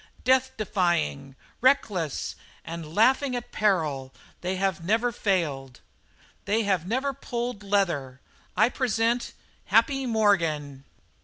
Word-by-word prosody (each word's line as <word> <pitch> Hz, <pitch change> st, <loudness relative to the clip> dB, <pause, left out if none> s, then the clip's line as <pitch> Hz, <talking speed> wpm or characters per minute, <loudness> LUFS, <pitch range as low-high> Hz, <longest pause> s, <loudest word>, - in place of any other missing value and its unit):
Death 260 Hz, +1 st, +3 dB
defying, 175 Hz, -, -1 dB, 0.3 s
reckless, 205 Hz, -, +1 dB, 0.3 s
and 165 Hz, -1 st, -7 dB
laughing 260 Hz, +4 st, +3 dB
at 245 Hz, -, -6 dB
peril, 155 Hz, -11 st, 0 dB, 0.3 s
they 185 Hz, +1 st, -2 dB
have 190 Hz, -2 st, -1 dB
never 225 Hz, +6 st, +1 dB
failed; 150 Hz, -, -1 dB, 0.7 s
they 220 Hz, +3 st, +1 dB
have 190 Hz, -4 st, 0 dB
never 265 Hz, +6 st, 0 dB
pulled 240 Hz, -3 st, -4 dB
leather. 170 Hz, -11 st, 0 dB, 0.4 s
I 235 Hz, -, +5 dB
present 240 Hz, -1 st, 0 dB, 0.3 s
'Happy' 270 Hz, -2 st, +2 dB
Morgan!" 165 Hz, -, +1 dB
200 Hz, 105 wpm, -26 LUFS, 160-240 Hz, 0.7 s, I